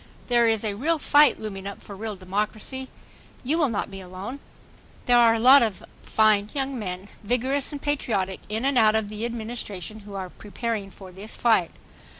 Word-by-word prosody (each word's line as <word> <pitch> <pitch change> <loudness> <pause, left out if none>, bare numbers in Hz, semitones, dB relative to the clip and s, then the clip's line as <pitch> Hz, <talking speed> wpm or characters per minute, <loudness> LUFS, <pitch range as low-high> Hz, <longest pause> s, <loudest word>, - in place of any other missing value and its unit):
There 240 -1 +4
is 225 -1 +2
a 210 -2 -1
real 310 +11 0
fight 295 -3 +5
looming 200 -3 -6
up 200 - -8
for 200 - -9
real 215 +1 -5
democracy. 210 +7 -3 0.6
You 300 +6 0
will 295 -5 +3
not 215 - -2
be 195 0 -8
alone. 190 +9 -7 0.7
There 245 -1 +5
are 230 -1 +6
a - - -1
lot 260 +4 +8
of 220 -5 -1 0.2
fine 215 -1 +3
young 270 -2 -2
men, 185 -1 -5 0.2
vigorous 255 +6 0
and 290 - -5
patriotic, 220 -10 -1
in 220 +4 -2
and 275 -2 +3
out 215 -1 +5
of 220 -2 0
the 215 +2 -4
Administration 220 -4 -5
who 205 -1 -11
are 185 -2 -5
preparing 215 -1 -4
for 190 -1 -13
this 195 +4 -7
fight. 220 -8 +3
220 Hz, 185 wpm, -25 LUFS, 200-245 Hz, 0.7 s, lot